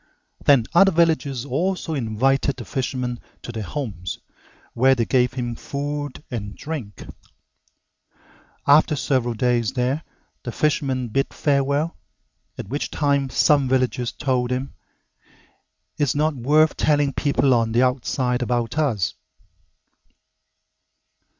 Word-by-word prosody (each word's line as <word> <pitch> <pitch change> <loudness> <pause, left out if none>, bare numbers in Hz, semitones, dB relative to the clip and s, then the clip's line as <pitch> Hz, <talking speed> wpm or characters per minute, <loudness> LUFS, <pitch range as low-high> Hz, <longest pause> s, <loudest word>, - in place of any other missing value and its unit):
Then 135 -6 +5
other 195 +3 +6
villagers 160 -6 +1
also 165 +5 -1
invited 135 +2 +1
the 120 - -8
fisherman 125 -3 -3 0.2
to - - -6
their 115 -2 -5
homes, 95 - -5 0.6
where 130 +3 +4
they 115 -2 0
gave 125 0 +2
him 120 -2 -3
food 145 +3 -5
and 105 -4 -5
drink. 140 -10 -6 1.6
After 150 +2 +5
several 130 -4 0
days 120 -1 +1
there, 130 +4 0 0.4
the 120 - -5
fisherman 135 -4 0
bid 135 +5 0
farewell, 140 +3 0 0.6
at - - -6
which 145 +4 -2
time 140 -2 +1
some 140 +1 +3
villagers 125 -2 0
told 130 -4 -1
him, 130 +2 -3 1.3
"It's 145 -4 +1
not 155 +2 +1
worth 150 +5 +3
telling 145 -2 +2
people 140 -2 +2
on 115 -2 +1
the 120 +3 +3
outside 125 0 0
about 120 +3 -1
us." 115 - 0
130 Hz, 120 wpm, -22 LUFS, 120-145 Hz, 1.6 s, other